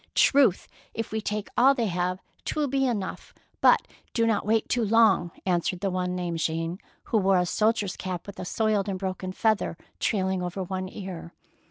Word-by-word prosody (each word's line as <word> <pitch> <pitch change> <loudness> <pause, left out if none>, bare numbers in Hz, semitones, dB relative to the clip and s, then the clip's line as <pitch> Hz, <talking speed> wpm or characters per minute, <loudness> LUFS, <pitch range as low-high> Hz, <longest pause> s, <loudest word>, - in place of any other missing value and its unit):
"Truth, 265 -10 +4 0.3
if 225 0 -3
we 220 0 -1
take 210 0 -3
all 270 +3 +6
they 235 - 0
have, 180 -1 -1 0.2
^t - - -3
will 300 -1 +1
be 270 0 +1
enough, 210 -6 -4 0.3
but - - +5 0.3
do 230 - +3
not 215 -3 +1
wait 220 0 +2
too 245 -1 +1
long,^^ 215 -5 +4 0.2
answered 180 0 0
the 195 -2 0
one 180 0 -1
named 175 -2 -2
Jean, 165 +3 -2 0.2
who 220 - +1
wore 195 -1 +3
a 180 - +2
soldier's 210 0 +1
cap 185 -2 -5
with 200 - -9
a - - -4
soiled 210 0 0
and 190 - -2
broken 185 -1 -4
feather 215 -4 0 0.2
trailing 190 -3 0
over 180 +2 -3
one 185 0 -4
ear. 185 -4 -8
195 Hz, 190 wpm, -26 LUFS, 180-220 Hz, 0.3 s, all